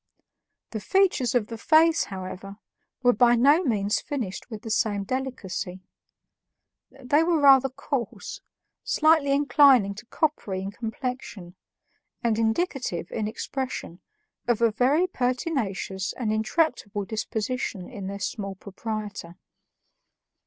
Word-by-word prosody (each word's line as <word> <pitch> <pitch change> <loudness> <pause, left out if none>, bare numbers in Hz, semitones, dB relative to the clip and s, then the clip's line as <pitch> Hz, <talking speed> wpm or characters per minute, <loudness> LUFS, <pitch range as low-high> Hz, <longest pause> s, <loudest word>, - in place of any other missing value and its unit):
The 220 - -3
features 355 - +2
of 235 -4 +3
the 230 +1 -8
face, 325 +4 +4
however, 190 +1 -7 0.5
were 245 0 +5
by 240 +2 +5
no 285 +8 +5
means 210 - 0
finished 245 -10 -5
with 220 -2 -8
the 225 - -5
same 205 -2 +1
delicacy; 195 -7 -4 1.1
they 275 +3 +1
were 330 -1 +2
rather 270 -2 +6
coarse, 240 -5 -4 0.4
slightly 310 -2 +3
inclining 275 -7 +5
to 215 +4 -12
coppery 210 -13 -1
in 195 - -4
complexion, 225 -4 -6 0.7
and 225 -2 +1
indicative, 225 - -1
in 215 -2 -2
expression, 240 -5 -5 0.5
of 240 -3 +2
a 230 -1 +3
very 265 +10 +3
pertinacious 245 - -2
and 220 -4 -2
intractable 215 -3 0
disposition 220 -2 -3
in 195 -2 -7
their 200 +1 -5
small 195 0 -4
proprietor. 205 -3 -6
230 Hz, 115 wpm, -26 LUFS, 200-270 Hz, 1.1 s, rather